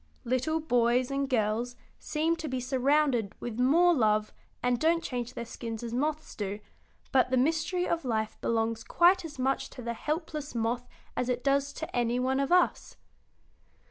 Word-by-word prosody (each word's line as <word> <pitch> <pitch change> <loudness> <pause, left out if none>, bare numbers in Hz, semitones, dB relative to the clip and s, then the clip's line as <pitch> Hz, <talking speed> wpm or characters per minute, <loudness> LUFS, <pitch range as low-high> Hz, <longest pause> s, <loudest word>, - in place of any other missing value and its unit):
Little 255 +6 0
boys 245 -3 +2
and 275 0 -1
girls 235 0 0 0.2
seem 320 +2 0
to 320 - -5
be 260 -2 -2
surrounded 260 -3 +1
with 240 -1 -5
more 335 +8 +5
love 215 -6 +2 0.3
and 245 -1 +2
don't 330 +1 +2
change 245 -4 -4
their 235 - -4
skins 230 -1 -6
as 235 -1 -5
moths 300 +4 -2
do, 205 0 -3 0.5
but 260 -1 +4
the 260 - +2
mystery 325 +6 +1
of 335 -1 -1
life 220 -4 -1
belongs 225 0 0
quite 355 +2 +4
as 310 -3 -8
much 265 +1 0
to 250 - -10
the 235 0 -2
helpless 300 +1 -4
moth 235 +2 -1 0.3
as 250 - -1
it 250 0 -1
does 280 0 +2
to 320 - -6
any 240 0 +1
one 260 +1 +1
of 275 +2 -1
us." 360 -1 +2
255 Hz, 175 wpm, -29 LUFS, 235-305 Hz, 0.5 s, more